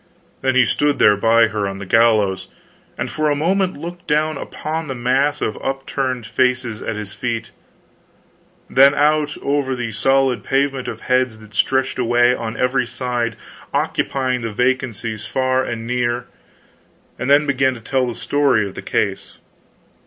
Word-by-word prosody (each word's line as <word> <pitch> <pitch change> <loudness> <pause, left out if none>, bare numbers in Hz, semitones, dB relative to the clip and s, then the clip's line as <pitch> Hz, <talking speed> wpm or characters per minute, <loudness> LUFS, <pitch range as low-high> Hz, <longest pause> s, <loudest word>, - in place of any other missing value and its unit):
Then 130 -1 +1
he 130 -1 +5
stood 145 +5 +1
there 105 -1 +5
by 115 +2 +4
her 105 -1 -2
on 95 0 -5
the 100 - -7
gallows, 105 -3 +3 0.5
and - - -2
for 155 -1 -1
a 145 - +2
moment 185 +5 0
looked 175 +3 -8
down 155 +1 +1
upon 155 +3 -5
the 135 - -4
mass 135 +4 +1
of 105 - -2
upturned 135 -2 -2
faces 125 -1 0
at 115 - -3
his 105 -2 -6
feet, 115 -4 -4 1.2
then 140 +2 +5
out 150 0 +2
over 140 -2 0
the 120 -2 -4
solid 135 +3 +2
pavement 135 -1 0
of 115 -1 -6
heads 125 -3 +1
that 110 -1 -16
stretched 130 +4 +1
away 120 0 +3
on 115 -2 -4
every 125 -1 +1
side 120 -2 -2 0.4
occupying 130 -2 0
the 115 -1 -3
vacancies 115 -2 -1
far 130 +1 +1
and 115 -2 -4
near, 120 0 -1 0.9
and 125 - -2
then 145 +1 +5
began 130 -2 +1
to - - -9
tell 130 +3 0
the 120 - -4
story 140 -8 +1
of 95 - -9
the - - -7
case. - - -2
125 Hz, 160 wpm, -19 LUFS, 115-135 Hz, 1.2 s, he